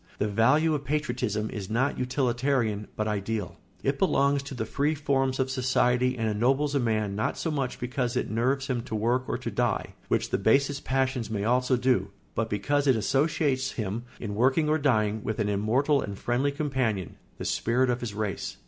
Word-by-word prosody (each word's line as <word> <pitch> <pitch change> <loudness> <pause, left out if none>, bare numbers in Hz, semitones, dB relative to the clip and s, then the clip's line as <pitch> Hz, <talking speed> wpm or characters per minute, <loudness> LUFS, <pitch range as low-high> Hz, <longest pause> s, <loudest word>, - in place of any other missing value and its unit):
The 105 - 0
value 130 +10 +3
of 145 -2 -2
patriotism 125 -8 -1
is 100 -3 -5
not 125 +6 0
utilitarian, 125 -4 0
but 110 - -1
ideal. 105 -1 -3 0.3
It 140 0 0
belongs 140 -6 +3
to 140 0 -8
the 110 - -2
free 145 +7 0
forms 135 -3 0
of 130 0 0
society 125 -1 +2
and 115 -1 0
ennobles 135 +7 +1
a 140 - +2
man 110 -4 0
not 110 - -1
so 160 - -2
much 135 -4 -2
because 125 0 -2
it - - 0
nerves 130 +5 0
him 125 -3 -1
to 110 - -4
work 120 +4 +1
or - - 0
to - - -5
die, - - -1
which - - 0
the - - +1
basest 140 +7 +2
passions 130 -3 0
may 105 -2 -2
also 125 +3 +2
do, 125 +1 +1 0.2
but 115 0 -1
because 140 +8 0
it 130 - +5
associates 135 - +1
him, 110 +1 -3
in 105 -3 -4
working 135 +8 +2
or 155 +1 +2
dying, 110 -7 +1
with 110 - -2
an 105 -2 0
immortal 125 +8 +2
and 100 -1 -5
friendly 125 +6 0
companion, 130 - -2 0.2
the - - -6
spirit 125 +2 +1
of 120 - -1
his 110 -4 -4
race. 105 -2 -3
125 Hz, 195 wpm, -27 LUFS, 110-140 Hz, 0.3 s, it